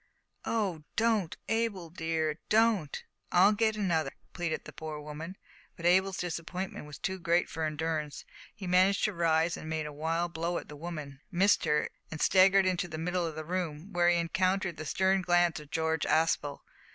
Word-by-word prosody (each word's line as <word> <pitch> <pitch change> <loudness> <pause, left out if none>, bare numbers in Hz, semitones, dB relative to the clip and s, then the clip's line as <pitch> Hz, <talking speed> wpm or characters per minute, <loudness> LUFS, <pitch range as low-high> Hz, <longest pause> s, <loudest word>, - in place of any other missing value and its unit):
"O 195 -8 -1
don't, 220 -6 +1
Abel 225 -7 -1
dear, 160 -2 -1
don't! 215 -9 +2 0.3
I'll 185 +3 +6
get 220 0 +1
another," 170 -8 0 0.2
pleaded 170 -3 -3
the - - -10
poor 155 -1 -6
woman; 155 +5 -7 0.4
but 170 - -8
Abel's 190 +2 +4
disappointment 175 0 -4
was 150 - -9
too 190 0 -3
great 170 0 +2
for 160 0 -3
endurance; 155 -1 -3 0.3
he 195 - -8
managed 185 +2 +3
to 210 - +2
rise, 165 -1 +2
and 155 - -7
made 160 -1 -2
a 150 - -6
wild 165 +3 -1
blow 170 +2 -1
at - - -7
the 150 - -8
woman, 150 -4 -7
missed 190 +1 +3
her, 150 -1 +1 0.2
and 160 - -6
staggered 190 +3 +5
into 180 -1 0
the 155 -2 -6
middle 175 +1 -1
of 160 - -6
the 155 0 -5
room. 175 0 -3
Here 175 0 +4
he 175 - +4
encountered 185 +1 0
the 155 - -6
stern 190 +3 +2
glance 175 -2 +3
of 150 -1 -13
George 160 0 0
Aspel. 155 -3 +1
170 Hz, 180 wpm, -30 LUFS, 160-190 Hz, 0.4 s, I'll